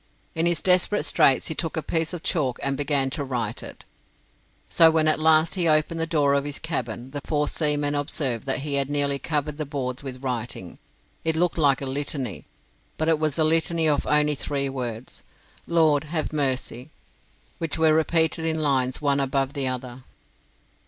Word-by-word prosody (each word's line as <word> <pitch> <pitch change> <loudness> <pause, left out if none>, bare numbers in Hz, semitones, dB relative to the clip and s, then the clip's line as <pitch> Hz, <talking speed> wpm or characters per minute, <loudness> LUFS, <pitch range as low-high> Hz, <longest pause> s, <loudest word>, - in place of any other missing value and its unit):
In 165 +1 +1
his 170 -2 +1
desperate 185 +3 +3
straits 135 - +3
he - - -2
took 165 +1 -4
a 160 - -2
piece 165 -1 -1
of 175 -3 -7
chalk 135 -7 0
and 140 0 0
began 140 -1 +1
to 140 - -3
write 120 -5 -3
it; - - -11 0.8
so 165 - +6
when 160 -1 +2
at 155 - +2
last 160 +1 +4
he 180 -3 +1
opened 155 +1 +2
the 165 - 0
door 145 -4 +2
of 140 0 +1
his 145 0 -4
cabin, 125 -5 -4
the 145 0 -5
four 150 -1 0
seamen 145 -2 +1
observed 140 -4 -2
that 135 - -1
he 145 0 -3
had 135 - -4
nearly 140 -1 +1
covered 150 0 -2
the - - 0
boards 130 -3 -4
with 130 -1 -8
writing. 120 -8 -5 0.4
It 160 -1 0
looked 175 +1 0
like 140 -3 +3
a - - -3
litany, 135 -4 -4 0.5
but 160 +1 0
it 160 -2 +2
was 155 -3 -1
a 160 - +2
litany 165 +1 +2
of 145 -2 0
only 150 0 +3
three 140 -1 -2
words 125 -2 -6 0.5
"Lord, 160 -3 +3
have 155 0 -3
mercy" 130 -2 -2 0.7
which 165 -1 -1
were 160 -1 +4
repeated 160 +1 +1
in 160 -1 -1
lines 135 -3 0
one 140 -1 +2
above 135 0 -1
the 140 -2 -2
other. 125 0 -5
145 Hz, 185 wpm, -24 LUFS, 135-160 Hz, 0.8 s, so